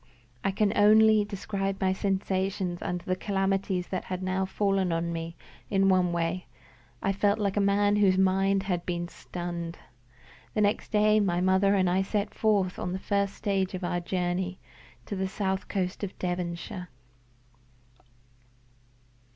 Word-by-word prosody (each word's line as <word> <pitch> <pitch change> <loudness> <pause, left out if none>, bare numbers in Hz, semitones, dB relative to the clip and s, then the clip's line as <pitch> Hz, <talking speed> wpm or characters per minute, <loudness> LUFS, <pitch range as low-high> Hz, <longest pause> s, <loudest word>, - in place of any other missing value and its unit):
I - - +2
can 200 +1 +1
only 215 +1 +6
describe 195 -1 -3
my 190 -1 +2
sensations 190 -2 -1
under 180 0 -3
the 185 - 0
calamities 195 -1 0
that 185 - -3
had 185 0 -4
now 190 +1 0
fallen 195 -1 0
on 170 0 -1
me 165 0 -5 0.3
in 195 -1 +3
one 185 -2 +3
way: 170 0 -2 0.6
I 195 - +2
felt 200 +1 +2
like 200 -2 -1
a - - +2
man 205 +1 +3
whose 195 -2 +4
mind 195 +1 +3
had 180 -3 -1
been 175 -1 -3
stunned. 175 -2 -6 0.8
The 215 - +2
next 205 0 +1
day 215 0 +4
my 180 -4 +1
mother 190 +2 +3
and 185 -2 +3
I 180 +2 +2
set 205 +1 -2
forth 200 -4 +1
on 180 - -3
the - - -1
first 200 0 -1
stage 195 -2 -1
of 185 - -6
our 175 0 0
journey 180 +1 -2 0.5
to 205 - -4
the 190 0 -1
south 190 0 -2
coast 185 0 -2
of 200 - -5
Devonshire. 180 0 -4
190 Hz, 155 wpm, -28 LUFS, 180-200 Hz, 0.8 s, only